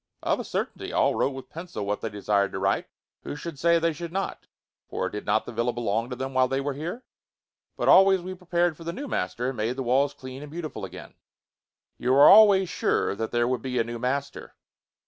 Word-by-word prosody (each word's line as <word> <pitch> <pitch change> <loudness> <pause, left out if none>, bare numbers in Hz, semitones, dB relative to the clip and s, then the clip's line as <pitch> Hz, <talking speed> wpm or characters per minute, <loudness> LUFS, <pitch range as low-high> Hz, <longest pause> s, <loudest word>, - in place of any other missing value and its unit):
"Of - - +1
a - - -3
certainty. - - -4
All - - +2
wrote - - +1
with 135 - -10
pencil 165 - -6
what 105 +1 -2
they 115 - -3
desired 100 -1 0
to - - -3
write. 95 +1 0 0.3
Who - - -6
should 150 -1 -7
say 170 +3 +4
they 165 0 +1
should 170 +2 -7
not? 195 +2 -4 0.4
For - - -2
did 105 - -7
not 110 +1 +2
the - - -7
villa 120 +1 0
belong 115 0 -1
to 125 - -4
them 130 +1 -5
while 130 0 +3
they 135 +1 -1
were 140 +1 -2
here? 170 - -6 0.7
But - - -1
always 195 0 +7
we 185 +1 -6
prepared 175 -2 0
for 165 - -11
the 170 +1 -4
new 280 +9 -6
master, 115 - -2
and 135 - -6
made 110 +3 -1
the 135 - -3
walls 135 +3 +2
clean 130 +1 -9
and 150 - -9
beautiful 155 - -5
again." - - -11 0.9
"You 125 +1 +1
were 140 +2 +8
always 200 -3 +7
sure - - 0
that 110 +2 -3
there 120 0 +1
would 125 -2 -1
be 125 0 -3
a - - +3
new 120 +1 -6
master?" 140 +3 -3
135 Hz, 225 wpm, -26 LUFS, 115-170 Hz, 0.9 s, were